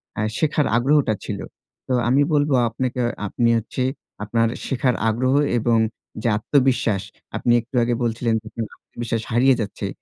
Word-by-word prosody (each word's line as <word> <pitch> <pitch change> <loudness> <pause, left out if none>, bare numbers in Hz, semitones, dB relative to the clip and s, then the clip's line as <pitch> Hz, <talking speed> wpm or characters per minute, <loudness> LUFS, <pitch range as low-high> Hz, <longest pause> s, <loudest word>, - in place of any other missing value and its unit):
অ্যা 105 - -1
শেখার 150 -1 +1
আগ্রহটা 135 -1 +3
ছিল। - - -4 0.5
তো 130 - 0 0.2
আমি 135 +3 +4
বলবো 145 -1 +2 0.2
আপনাকে, 125 +2 -3
অ - - 0 0.2
আপনি 115 +4 +1
হচ্ছে 115 +3 -3 0.4
আপনার 115 +2 +1 0.2
শেখার 125 -2 +1
আগ্রহ 130 +4 +1 0.3
এবং 115 0 +2 0.4
যে - - -1
আত্মবিশ্বাস, 125 -5 +2 0.4
আপনি 120 - +1
একটু 120 +3 -12
আগে 120 0 +1
বলছিলেন 115 0 0
যে, 110 - -31
"আপনার 115 -2 -4 0.2
আত্মবিশ্বাস 115 -1 -3
হারিয়ে 125 +3 +4
যাচ্ছে," 100 - -4
120 Hz, 155 wpm, -22 LUFS, 115-130 Hz, 0.5 s, আমি